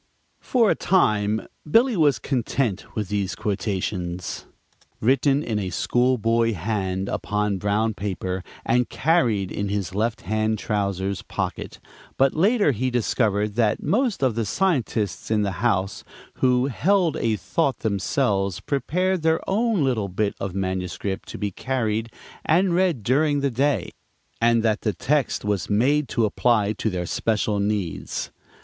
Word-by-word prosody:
For 235 -5 +2
a - - +5
time 110 - +2 0.2
Billy 235 - +4
was 150 - +3
content 120 -3 -2
with 105 -4 -2
these 100 -2 -1
quotations, 95 -3 -3 0.5
written 135 +4 +2
in 110 -6 -1
a 95 -2 -2
school 125 +8 +1
boy 115 +1 +2
hand 95 0 -2
upon 105 -1 -1
brown 105 +3 +1
paper, 95 -2 -3 0.2
and 120 0 +2
carried 120 - +1
in 100 -1 -2
his 100 -3 -2
left 110 +3 -1
hand 110 +3 0
trousers 100 -3 -2
pocket, - - -4 0.4
but 135 0 +3
later 200 0 +3
he 130 +1 -1
discovered 105 -4 0
that 110 -2 +1
most 230 - +1
of 130 -3 +3
the 115 +1 -1
scientists 120 - -1
in 110 -1 +2
the 100 - -1
house 100 -5 0 0.3
who 125 -1 +3
"held 170 - +2
a 115 -5 +1
thought" 130 - -1
themselves 100 - 0
prepared 180 +6 0
their 160 0 +1
own 215 -3 +1
little 115 -7 0
bit 100 +3 -1
of 95 -2 -4
manuscript 95 0 -3
to - - -6
be 105 -1 -2
carried 115 -1 -2 0.3
and 175 +3 +3
read 175 - +1
during 145 +4 +2
the 140 -1 +1
day, 140 +4 0 0.5
and 115 -1 +3
that 110 -2 +1
the 105 - 0
text 140 - 0
was 105 -2 -1
made 135 +8 +2
to 115 - +1
apply 110 -1 +2
to 110 - -2
their 90 -3 -3
special 105 +2 0
needs. 95 -9 -2
110 Hz, 145 wpm, -24 LUFS, 100-135 Hz, 0.5 s, a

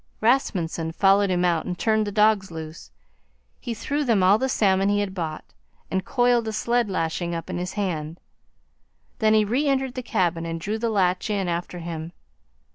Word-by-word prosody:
Rasmunsen 175 -9 0
followed 195 +2 +4
him 180 -1 +1
out 170 -2 +1
and 180 -1 -3
turned 215 0 +1
the - - -3
dogs 210 -1 +3
loose. 160 -1 -8 0.7
He 235 -3 -5
threw 285 +7 -2
them 225 -8 +2
all 195 +4 +5
the 265 - 0
salmon 195 -4 +2
he 205 0 +2
had 200 -2 -2
bought, 160 -4 -5 0.4
and 190 0 0
coiled 245 0 +2
a - - -1
sled 235 0 0
lashing 170 -1 -2
up 165 - -5
in - - -3
his 180 +1 -4
hand. 170 -5 -3 1.0
Then 220 -1 +4
he 215 -1 +4
re 255 +8 0
entered 265 -2 0
the 255 - -4
cabin 180 -8 0
and 165 0 -4
drew 210 +6 -3
the 230 +1 0
latch 190 -2 +1
in 200 -3 -1
after 175 +1 -3
him. 165 -1 -6
195 Hz, 190 wpm, -24 LUFS, 170-220 Hz, 1.0 s, all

